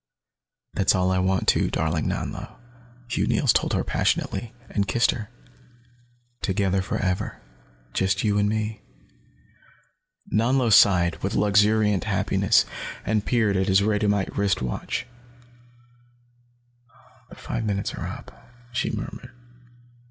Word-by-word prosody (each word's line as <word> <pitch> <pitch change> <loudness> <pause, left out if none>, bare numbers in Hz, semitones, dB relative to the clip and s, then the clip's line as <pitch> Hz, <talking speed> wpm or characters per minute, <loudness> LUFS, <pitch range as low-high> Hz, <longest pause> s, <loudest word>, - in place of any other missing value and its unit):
"That's 95 - +2
all 90 0 +1
I 95 - +1
want, 95 0 0
too, - - +3
darling 80 0 -1
Nanlo," - - -4 0.5
Hugh 120 - -1
Neils - - +3
told - - +1
her - - 0
passionately, 110 +4 -1 0.2
and 100 -2 -1
kissed 115 +5 +3
her. 110 -3 -6 1.1
"Together, 95 -1 0
forever. 95 0 -2 0.5
Just 95 0 0
you 105 -2 +2
and 105 0 +2
me." 110 0 -2 1.5
Nanlo 120 +2 +2
sighed, 90 -4 +5
with 100 - -2
luxuriant 105 -1 +3
happiness, - - +2 0.4
and 105 -1 0
peered 110 -5 +2
at 95 0 +1
his 95 0 +4
radiumite 105 -1 0
wrist 100 -1 +1
watch. 65 - -3 2.2
"The - - -12
five 115 - -4
minutes 100 -2 -2
are - - -5
up," - - -8 0.4
she 120 - -1
murmured. 125 - -6
100 Hz, 120 wpm, -24 LUFS, 95-110 Hz, 2.2 s, sighed